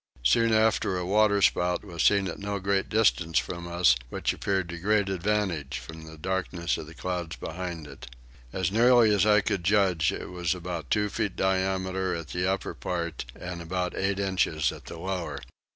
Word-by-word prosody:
Soon 115 Hz, -, +4 dB
after 110 Hz, -4 st, +2 dB
a 90 Hz, -, -3 dB
water 100 Hz, +1 st, +3 dB
spout 90 Hz, 0 st, +2 dB
was 85 Hz, -4 st, -4 dB
seen 100 Hz, -2 st, +4 dB
at 85 Hz, -, -5 dB
no 100 Hz, 0 st, -3 dB
great 95 Hz, 0 st, 0 dB
distance 90 Hz, -7 st, +2 dB
from 85 Hz, +6 st, -2 dB
us, 85 Hz, -7 st, +4 dB
which -, -, -1 dB
appeared 95 Hz, -3 st, -1 dB
to 85 Hz, 0 st, -6 dB
great 100 Hz, +1 st, +2 dB
advantage 95 Hz, -6 st, -1 dB
from 80 Hz, 0 st, -9 dB
the 80 Hz, 0 st, -11 dB
darkness 90 Hz, 0 st, -2 dB
of 75 Hz, -, -8 dB
the 80 Hz, -, -12 dB
clouds 90 Hz, -3 st, -4 dB
behind 85 Hz, -2 st, -6 dB
it. 70 Hz, -2 st, -11 dB, 0.4 s
As 95 Hz, -1 st, -1 dB
nearly 120 Hz, 0 st, +5 dB
as 100 Hz, 0 st, +3 dB
I 105 Hz, 0 st, +5 dB
could 95 Hz, -1 st, -2 dB
judge 95 Hz, -4 st, +3 dB
it -, -, -6 dB
was 90 Hz, -1 st, -1 dB
about 85 Hz, -5 st, -5 dB
two 105 Hz, 0 st, +2 dB
feet 105 Hz, -2 st, -2 dB
diameter 95 Hz, -1 st, 0 dB
at 85 Hz, -3 st, -6 dB
the 90 Hz, +2 st, 0 dB
upper 95 Hz, -, -3 dB
part, 85 Hz, -5 st, -4 dB
and 90 Hz, -1 st, -6 dB
about 90 Hz, +2 st, -2 dB
eight 100 Hz, 0 st, 0 dB
inches 95 Hz, -6 st, +1 dB
at -, -, -11 dB
the -, -, -8 dB
lower. 85 Hz, -4 st, -3 dB
95 Hz, 185 wpm, -27 LUFS, 85-100 Hz, 0.4 s, nearly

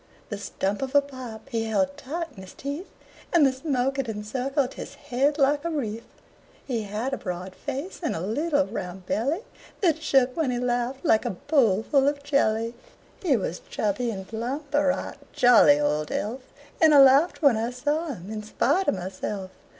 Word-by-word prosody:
The 205 Hz, -, -4 dB
stump 200 Hz, +1 st, -2 dB
of 270 Hz, +1 st, -4 dB
a 285 Hz, -, +8 dB
pipe 255 Hz, -6 st, -9 dB
he 225 Hz, -1 st, -1 dB
held 280 Hz, +6 st, 0 dB
tight 295 Hz, +4 st, -4 dB
in 190 Hz, -, -10 dB
his 190 Hz, -, -12 dB
teeth, 285 Hz, +7 st, -5 dB, 0.4 s
And 335 Hz, -5 st, +5 dB
the 270 Hz, -, +3 dB
smoke 265 Hz, -1 st, -1 dB
it 260 Hz, -4 st, -1 dB
encircled 250 Hz, +6 st, -2 dB
his -, -, -8 dB
head 275 Hz, +4 st, 0 dB
like 285 Hz, 0 st, +3 dB
a 335 Hz, -, -1 dB
wreath. 230 Hz, -8 st, -3 dB, 0.6 s
He 240 Hz, -4 st, -1 dB
had 215 Hz, +7 st, -3 dB
a -, -, 0 dB
broad 180 Hz, 0 st, -5 dB
face, 280 Hz, -, -5 dB
and 320 Hz, -, -1 dB
a -, -, -3 dB
little 285 Hz, -, +1 dB
round 180 Hz, -4 st, -6 dB
belly 280 Hz, -, -1 dB, 0.4 s
That 325 Hz, -5 st, +2 dB
shook, 265 Hz, -4 st, +3 dB
when 320 Hz, -5 st, 0 dB
he 245 Hz, -, -1 dB
laughed, 245 Hz, +3 st, -1 dB
like 220 Hz, -8 st, +4 dB
a -, -, -1 dB, 0.2 s
bowl 230 Hz, -9 st, +3 dB
full 275 Hz, +2 st, +3 dB
of 285 Hz, 0 st, 0 dB
jelly. 230 Hz, -5 st, +1 dB, 0.5 s
He 295 Hz, -10 st, +3 dB
was 180 Hz, -4 st, -4 dB
chubby 215 Hz, +3 st, -1 dB
and 190 Hz, -4 st, -5 dB
plump, 265 Hz, +6 st, -4 dB
a 290 Hz, +1 st, +4 dB
right 275 Hz, -1 st, -1 dB, 0.2 s
jolly 225 Hz, -12 st, +6 dB
old 150 Hz, +1 st, 0 dB
elf 235 Hz, +6 st, -2 dB, 0.4 s
And 315 Hz, -2 st, +7 dB
I -, -, +9 dB
laughed 275 Hz, +6 st, +5 dB
when 280 Hz, -5 st, +6 dB
I 225 Hz, +2 st, -1 dB
saw 295 Hz, +6 st, -1 dB
him, 210 Hz, -, -7 dB
in 215 Hz, -1 st, -4 dB
spite 355 Hz, -, +1 dB
of -, -, +3 dB
myself. 185 Hz, +1 st, -5 dB
255 Hz, 190 wpm, -26 LUFS, 215-285 Hz, 0.6 s, I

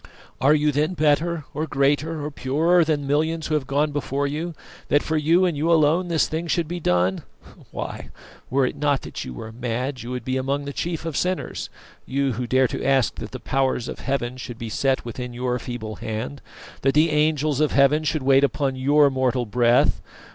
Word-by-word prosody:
Are 140 Hz, +3 st, +5 dB
you 150 Hz, 0 st, +2 dB
then 150 Hz, +5 st, 0 dB
better, 155 Hz, +1 st, +1 dB
or 155 Hz, +2 st, -2 dB
greater, 145 Hz, +2 st, 0 dB
or 150 Hz, -, -4 dB
purer 160 Hz, +6 st, +2 dB
than 150 Hz, -3 st, -1 dB
millions 155 Hz, +3 st, 0 dB
who 155 Hz, -, -2 dB
have 145 Hz, -4 st, 0 dB
gone 145 Hz, +2 st, +1 dB
before 145 Hz, -1 st, -2 dB
you, 155 Hz, +4 st, -3 dB, 0.3 s
that 145 Hz, -, +3 dB
for 160 Hz, -, -1 dB
you 165 Hz, +4 st, +3 dB
and 175 Hz, -3 st, 0 dB
you 155 Hz, +4 st, +1 dB
alone 165 Hz, +3 st, +3 dB
this 165 Hz, -2 st, +2 dB
thing 160 Hz, +2 st, -3 dB
should 170 Hz, -1 st, 0 dB
be 175 Hz, +2 st, -4 dB
done? 90 Hz, -, +1 dB, 0.5 s
Why, -, -, -6 dB, 0.4 s
were 135 Hz, 0 st, +2 dB
it -, -, -2 dB
not 145 Hz, -2 st, 0 dB
that -, -, -6 dB
you 60 Hz, -1 st, -8 dB
are 110 Hz, -, -7 dB
mad, 125 Hz, +3 st, -3 dB
you 120 Hz, -, -7 dB
would 125 Hz, -2 st, -5 dB
be 130 Hz, 0 st, -1 dB
among 140 Hz, +2 st, -1 dB
the 140 Hz, -, -5 dB
chief 165 Hz, +1 st, -3 dB
of 165 Hz, -3 st, -3 dB
sinners; 185 Hz, 0 st, -2 dB, 0.4 s
you 140 Hz, 0 st, 0 dB
who 120 Hz, +2 st, -3 dB
dare 130 Hz, +1 st, +3 dB
to -, -, -4 dB
ask 135 Hz, -3 st, +2 dB
that 110 Hz, -, -6 dB
the 130 Hz, -, -7 dB
Powers 130 Hz, -2 st, 0 dB
of -, -, -6 dB
Heaven 130 Hz, -2 st, -2 dB
should 120 Hz, -2 st, -7 dB
be 115 Hz, -2 st, -6 dB
set 135 Hz, +4 st, 0 dB
within 125 Hz, +1 st, -6 dB
your 125 Hz, 0 st, -2 dB
feeble 110 Hz, -4 st, -6 dB
hand, 115 Hz, +4 st, -5 dB, 0.4 s
that 135 Hz, +1 st, +2 dB
the 155 Hz, +2 st, +4 dB
Angels 150 Hz, -1 st, +1 dB
of 155 Hz, -1 st, +2 dB
Heaven 145 Hz, +3 st, +4 dB
should 155 Hz, -1 st, -1 dB
wait 135 Hz, +1 st, +5 dB
upon 135 Hz, 0 st, 0 dB
your 140 Hz, +2 st, +4 dB
mortal 130 Hz, -1 st, 0 dB
breath. 120 Hz, +2 st, +3 dB
140 Hz, 205 wpm, -23 LUFS, 130-155 Hz, 0.5 s, Are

